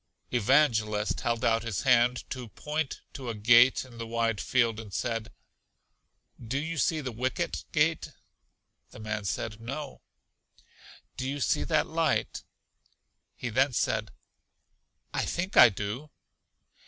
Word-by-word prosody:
Evangelist 110 - +2
held 120 -2 -1
out 115 0 +3
his 115 -5 -3
hand 125 -1 +3
to 125 -2 -5
point 150 - -4
to 130 -3 -6
a 115 - -3
gate 120 +5 +5
in 120 -2 -14
the 115 - -5
wide 115 -2 0
field, 115 -3 +1
and 110 -3 -9
said, 115 +1 -3 1.1
Do 120 +4 -2
you 160 +2 -3
see 155 +1 +1
the 130 -3 -4
Wicket 130 +9 -2
Gate? 160 +1 +1 0.8
The - - -13
man 105 -1 -4
said, 105 +4 -3
No. 135 +4 -6 1.2
Do 130 +1 -3
you 145 +1 -3
see 115 - +1
that - - +2
light? - - 0 0.9
He 125 - -4
then 130 +4 +2
said, 110 -2 0 1.0
I - - 0
think 185 +3 -3
I 120 - +10
do. 105 +8 -5
120 Hz, 135 wpm, -28 LUFS, 110-135 Hz, 1.2 s, I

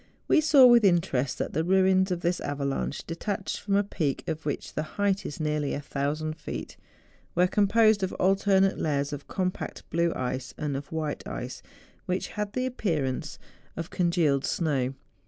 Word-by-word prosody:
We - - +5
saw 295 -4 +7
with 240 -2 +7
interest 170 -9 +2
that - - -3
the 160 - +1
ruins 190 +1 +3
of 180 -2 -2
this 175 +1 0
avalanche 140 0 -2
detached 195 +4 -3
from 200 -1 -1
a 200 - +4
peak, 160 -7 -2
of 160 -2 -3
which 145 - -3
the - - -1 0.2
height 200 -1 +1
is 145 - -7
nearly 150 -2 -1
a - - -3
thousand 150 +2 -3
feet, - - -6 0.6
were 180 - +5
composed 210 +2 +4
of 190 - -1
alternate 195 0 +3
layers 145 -1 0
of 145 0 -7
compact 185 -1 -3
blue 170 0 +2
ice 130 +1 -3
and 150 -2 -2
of 140 +1 -6
white 155 -2 -3
ice, 125 +1 -6 0.5
which 180 0 -1
had 210 -1 -4
the 255 0 -1
appearance 155 - -2 0.4
of 165 0 -5
congealed 170 -6 +2
snow. 135 -6 0
170 Hz, 170 wpm, -27 LUFS, 145-195 Hz, 0.6 s, saw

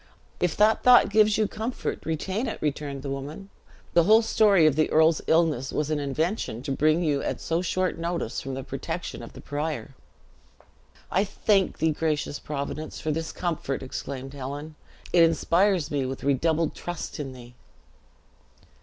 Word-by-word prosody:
"If 180 -2 0
that 215 +1 +4
thought 245 -4 +6
gives 215 0 +4
you 215 -1 +2
comfort, 225 -2 -4
retain 190 - -2
it," 220 - -4
returned 145 -2 -3
the 140 - -4
woman; 145 +9 -7 0.4
"the 170 -1 +5
whole 220 +2 +6
story 205 -6 +4
of 155 -3 +4
the 155 0 +2
earl's 160 0 +4
illness 160 -6 +2
was 150 0 -1
an 155 - 0
invention 145 - -2
to 140 - -3
bring 155 +5 +2
you 145 -3 +1
at - - -3
so 165 +1 -1
short 185 -1 -1
notice 170 -8 -2
from 135 -1 -5
the 135 - -5
protection - - -5
of - - -10
the - - -11
prior." 150 0 -4 1.2
"I 190 - +3
thank 195 -1 +1
thee, 160 +1 +2
gracious 150 -1 -1
Providence, 150 +1 -5
for 155 - -2
this 160 +1 -3
comfort!" 160 -6 -3
exclaimed 135 +1 -6
Helen; 145 +3 -6 0.4
"it 175 - +6
inspires 165 +1 +3
me 140 -3 0
with 135 0 -6
redoubled 155 +4 +1
trust 175 -3 -6
in 135 -3 -5
thee." 120 -1 -12
155 Hz, 165 wpm, -26 LUFS, 140-180 Hz, 1.2 s, thought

